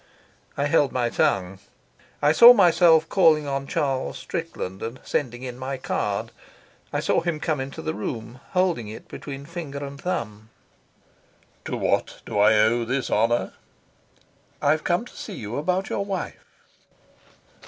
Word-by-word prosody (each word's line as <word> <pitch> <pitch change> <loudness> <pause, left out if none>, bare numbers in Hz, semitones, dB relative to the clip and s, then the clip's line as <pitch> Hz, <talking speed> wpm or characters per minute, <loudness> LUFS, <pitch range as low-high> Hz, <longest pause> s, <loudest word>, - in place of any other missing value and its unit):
I 140 - +1
held 145 -2 +3
my 120 -2 0
tongue. 95 0 0 0.6
I 145 - +5
saw 235 +10 +10
myself 170 -5 +5
calling 160 -6 +4
on 140 0 -3
Charles 135 -3 -1
Strickland 165 - -5
and 115 +3 -5
sending 120 -3 -2
in 125 -1 -6
my 135 +1 -4
card; 105 -6 -2 0.6
I - - -1
saw - - +2
him 165 -2 -2
come 155 -2 -1
into 135 +1 -6
the - - -2
room, 115 +3 -6
holding 180 - +1
it 110 +1 -9
between 140 -1 -8
finger 145 -4 -6
and 140 0 -9
thumb: 110 - -4 1.2
"To - - -3
what - - -1
do 105 - -2
I 105 +2 +6
owe 115 +2 +3
this 130 +3 -2
honour?" 120 +1 +1 1.1
"I've 155 +2 +2
come 175 +6 0
to - - -15
see 205 - -7
you 110 -4 -5
about 180 +6 -1
your 200 - -1
wife." 195 -2 -5
140 Hz, 150 wpm, -24 LUFS, 120-165 Hz, 1.2 s, saw